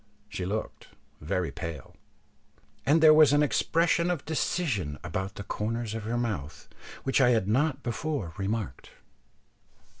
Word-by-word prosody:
She 90 -3 -4
looked 105 +3 -4 0.3
very 85 +3 -2
pale, 85 -6 -7 0.9
and 160 +3 +4
there 155 -1 +9
was 155 -2 +6
an 145 0 +4
expression 170 +3 +2
of 175 -6 -2
decision 130 - -1
about 95 +4 -4
the 100 - -6
corners 110 +2 -3
of 110 -2 -5
her 115 +2 -1
mouth 80 - -4 0.4
which 135 +1 +2
I 125 - +5
had 115 -5 +2
not 135 +5 +1
before 120 - -3
remarked. 100 +2 -4
115 Hz, 140 wpm, -28 LUFS, 95-145 Hz, 0.9 s, there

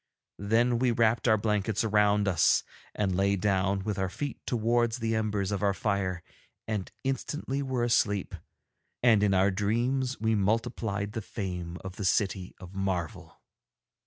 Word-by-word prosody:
Then 115 +4 +2
we 125 0 +2
wrapped 115 0 +2
our 110 -2 +5
blankets 105 0 0
around 105 -1 +3
us 90 -5 +3 0.3
and 100 -3 0
lay 100 +1 +2
down 95 0 +1
with 105 -1 -3
our 95 -1 0
feet 140 +9 -5
towards 120 0 +1
the 115 -2 -1
embers 105 -3 -1
of 100 - -2
our 100 -1 +2
fire 95 -4 -1 0.4
and 105 -4 -3
instantly 135 +1 -2
were 130 -3 -1
asleep, 105 -4 +1 0.7
and 115 -4 +5
in 100 -2 +3
our 95 +2 +4
dreams 120 +6 0
we 110 0 +1
multiplied 105 -1 -1
the 110 +1 -4
fame 90 -5 -5
of 95 0 -8
the 100 - -3
City 95 0 0
of 90 +1 -11
Marvel. 95 -4 -3
105 Hz, 155 wpm, -28 LUFS, 95-115 Hz, 0.7 s, our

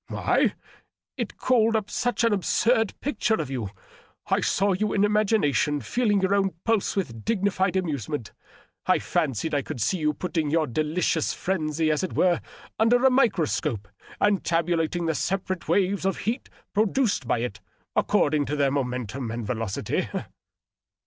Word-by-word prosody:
" - - -49
Why? - - +1 0.6
It - - -4
called 230 -3 +3
up 210 -2 -1
such 245 0 0
an 230 -2 +3
absurd 225 +3 +1
picture 225 -5 0
of 150 -9 -4
you 120 -7 -3 0.6
I - - +1
I - - -1
saw 195 +1 +2
you 210 +3 -1
in 200 - +2
imagination 195 - +2
feeling 205 - +1
your 190 +1 +2
own 195 -3 +1
pulse 225 -3 +1
with 115 - -3
dignified 195 -3 0
amazement. 145 - -2 0.6
I - - +5
&ncied 135 +5 -1
I 145 - +2
could 125 - -6
see 145 - 0
you 150 -1 +1
putting 160 -2 -2
your 160 +1 +2
delicious 155 +4 0
frenzy, 155 -4 0
as 155 +4 0
it 185 - -3
were, 180 -2 +2 0.4
under 245 +3 +4
a 265 - +6
microscope 150 - +1 0.3
and 205 -2 +2
tabulating 170 0 0
the 160 - +1
separate 185 +1 -2
waves 200 0 +1
of 195 0 0
heat 235 +5 -3 0.2
produced 215 - +1
by 120 - +1
it, 110 -3 -4 0.4
according 145 -1 +2
to 150 - -1
their 140 -2 +2
momentum 125 -2 -3
and 115 0 -4
velocity." 110 -3 -2
175 Hz, 160 wpm, -25 LUFS, 145-205 Hz, 0.6 s, a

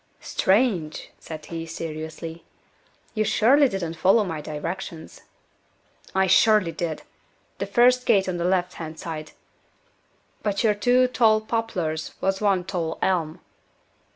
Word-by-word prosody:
"Strange!" 190 -7 0
said 155 -1 -9
he, 165 -1 -5
seriously. 160 +1 -6 0.7
"You 215 - +1
surely 245 +7 +4
didn't 175 -6 -3
follow 195 +6 +4
my 165 -6 -4
directions." 165 +3 -6 0.9
"I 190 0 +4
surely 210 -1 +4
did. 165 -2 -4 0.6
The - - -2
first 250 +1 +4
gate 195 -2 +4
on 180 -1 -2
the 170 - -2
left 180 0 +1
hand 160 0 -7
side. 155 -2 -7 1.1
But 200 -2 -1
your 215 -2 +4
two 245 +4 +3
tall 225 -3 +3
poplars 215 -9 -3
was 195 +1 -1
one 195 -3 +2
tall 170 -3 -3
elm." 165 -5 0
185 Hz, 125 wpm, -24 LUFS, 160-215 Hz, 1.1 s, surely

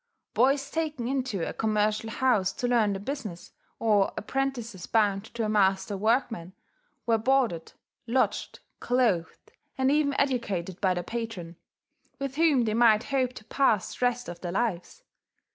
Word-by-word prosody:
Boys 275 +3 +2
taken 310 -7 -2
into 255 -9 -1
a - - -4
commercial 215 0 0
house 220 -6 +2
to 245 - -2
learn 225 -4 +3
the 195 - -4
business, 215 -6 -6 0.3
or 210 -3 +2
apprentices 235 -6 -3
bound 205 -2 +2
to 230 0 -4
a - - 0
master 200 -1 +2
workman, 220 -4 0 0.5
were 230 -1 +2
boarded, 240 -9 +1 0.3
lodged, 255 +3 0 0.2
clothed, 225 -10 0 0.3
and 265 0 +2
even 290 -1 +2
educated 200 -10 -1
by 185 -2 +2
their 175 - -2
patron, 210 -6 -5 0.6
with 275 -1 -4
whom 310 -6 +4
they 215 -2 0
might 225 -1 +5
hope 255 -2 +1
to 215 - -11
pass 225 -9 +1
the - - -5
rest 245 0 +1
of 175 - -8
their 175 -1 -4
lives. 225 - -2
225 Hz, 150 wpm, -27 LUFS, 195-260 Hz, 0.6 s, might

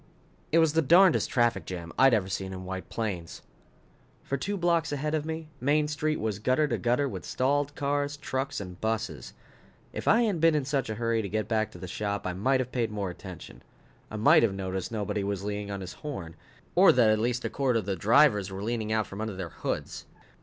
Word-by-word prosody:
_ - - -27 0.5
It 160 - +4
was 160 -2 +4
the 165 - +3
darnedest 175 +4 +5
traffic 120 -5 +2
jam 85 -2 -7
I'd 135 -2 +6
ever 100 -4 0
seen 95 0 -4
in 95 0 -7
White 95 0 -6
Plains. 95 -8 -4 0.8
For 140 - -2
two 200 +10 -3
blocks 170 -3 +1
ahead 150 +2 -2
of 155 -1 0
me, 160 -1 -5
Main 150 +4 +2
Street 155 0 -1
was 105 -2 -2
gutter 130 +7 +2
to - - -1
gutter 125 +4 +1
with - - -6
stalled 145 +2 0
cars, 145 0 -1
trucks 135 -2 -3
and 90 -3 -8
buses. 110 - -3 0.6
If - - -6
I 230 +3 +5
hadn't 200 -8 0
been 165 -1 +5
in 145 -3 0
such 135 -3 -1
a 110 - -2
hurry 115 0 0
to 100 - -5
get 110 +1 -2
back 110 -2 0
to - - -10
the 90 - -7
shop, 100 +2 -3
I 90 - -1
might 130 +9 +1
have 130 -1 -3
paid 120 -3 0
more 100 -3 -3
attention. 90 -1 -10 0.5
I - - -7
might 105 +1 +6
have 105 -4 +1
noticed 95 0 -4
nobody 105 -2 -2
was 100 -1 -3
leaning 105 0 -4
on 100 -1 -4
his 95 - -7
horn. 95 - -7 0.4
Or - - +7
that 120 -4 +4
at 110 - +2
least 120 +2 -1
a - - 0
quarter 130 -4 +1
of 110 - -2
the 100 -1 -1
drivers 105 - +4
were 95 +1 -5
out - - -4
peering 115 -2 -2 0.3
under 110 -3 -3
their 90 -3 -5
hoods. - - -5
115 Hz, 225 wpm, -28 LUFS, 100-145 Hz, 0.8 s, Or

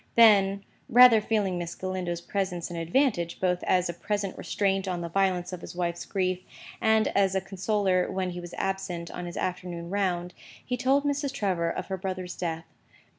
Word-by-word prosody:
Then 200 -3 +6 0.3
(rather 245 -2 +8
feeling 205 -4 0
Miss 170 -1 -5
Galindo's 185 -2 -3
presence 180 -2 -3
an - - -5
advantage, 170 - 0
both 180 -1 +1
as 180 -1 +2
a 175 - -3
present 205 +2 -2
restraint 195 -1 0
on 180 -2 -2
the 170 - -4
violence 185 -1 0
of 180 - -6
his 175 - -9
wife's 175 -1 -2
grief, 185 -2 -1 0.4
and 220 -1 +3
as 195 -1 +2
a - - +3
consoler 195 -1 0
when 190 -1 -2
he 175 - -6
was 175 0 -8
absent 185 -3 -3
on 175 0 -6
his 175 - -7
afternoon 175 -2 -4
round), 180 -3 -1 0.3
he 250 - -1
told 270 +3 +2
Mrs. 285 -1 -1
Trevor 185 -9 0
of - - -3
her 190 - -3
brother's 185 -1 -4
death. 165 -2 -3
185 Hz, 180 wpm, -27 LUFS, 175-200 Hz, 0.4 s, rather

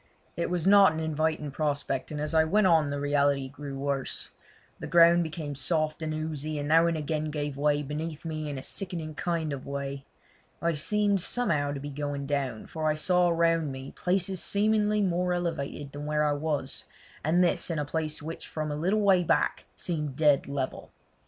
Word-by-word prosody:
It 170 - -1
was 175 -2 -1
not 195 -3 +7
an 160 - -3
inviting 155 -1 -1
prospect, 145 -2 -2
and 150 - -5
as 150 +2 -2
I 160 0 +5
went 200 +6 +3
on 160 -5 +4
the 145 0 -2
reality 140 -1 +1
grew 140 0 -7
worse. 140 -1 -2 0.5
The - - -6
ground 170 0 +6
became 160 -3 -4
soft 155 +3 0
and 155 -1 -2
oozy, 155 -1 -3
and 145 0 -3
now 165 +2 +5
and 165 -1 0
again 155 0 -2
gave 145 -2 -3
way 145 +1 +1
beneath 155 +2 -5
me 155 -2 -3
in 140 - -4
a 130 - -6
sickening 170 -5 -4
kind 160 -2 -2
of 135 - -7
way. 140 0 -4 0.6
I 170 0 +1
seemed 200 +5 +1
somehow 155 -10 0
to 140 - -4
be 145 +1 -6
going 145 0 -3
down, 140 -5 -2
for 155 -1 -2
I 155 - +1
saw 180 +3 +3
round 165 -3 +2
me 130 +1 -7
places 185 0 0
seemingly 210 0 +2
more 180 -1 +1
elevated 150 -5 -3
than 145 +1 -6
where 150 0 +1
I 150 - +2
was, 145 -2 -2 0.4
and 170 +4 +3
this 175 - +1
in 165 - -1
a 150 - -1
place 155 0 -2
which 165 +2 -6
from 155 -1 -3
a - - -2
little 185 +8 +1
way 190 -3 +4
back - - +1
seemed 150 -6 -3
dead 145 -2 +3
level. 140 -2 -4
155 Hz, 195 wpm, -28 LUFS, 145-170 Hz, 0.6 s, not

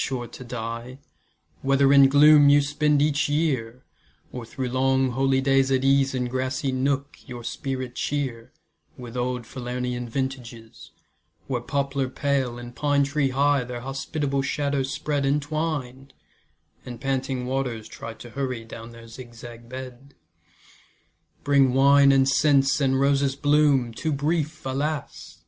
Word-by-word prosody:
sure 125 -2 -3
to 120 +2 -11
die, 120 +1 -6 0.6
Whether 135 0 +3
in 140 -1 +7
gloom 145 +1 +7
you 145 0 +6
spend 145 0 +1
each 150 0 +1
year, 130 -6 -1 0.5
Or 125 -2 -7
through 130 +1 -4
long 130 +1 +1
holydays 135 +1 +2
at 130 0 +1
ease 135 0 +3
In 125 -1 -1
grassy 130 +2 -2
nook 140 +2 -1
your 120 -2 -8
spirit 130 0 -4
cheer 130 -5 -3 0.5
With 120 -1 -9
old 125 0 -2
Falernian 125 0 -4
vintages, 120 -3 -6 0.6
Where 125 -3 -2
poplar 140 0 -2
pale, 135 -3 -1
and 120 0 -10
pine 145 -1 +2
tree 140 0 0
high 140 0 +2
Their 120 -1 -7
hospitable 135 +2 -2
shadows 140 -1 -1
spread 140 +2 -2
Entwined, 140 -2 -2 0.7
and 120 -2 -8
panting 135 -1 -2
waters 125 -4 -3
try 115 0 -9
To 120 - -12
hurry 130 -4 -4
down 115 +1 -10
their 115 0 -13
zigzag 120 0 -11
bed. 130 +1 -9 1.3
Bring 135 -3 +3
wine 140 +1 +6
and 135 -1 +4
scents, 135 +1 +3
and 135 -1 +2
roses' 140 0 +2
bloom, 145 -4 +2
Too 155 +7 -3
brief, 155 +1 -2
alas! 140 +3 -4
135 Hz, 135 wpm, -24 LUFS, 125-140 Hz, 1.3 s, in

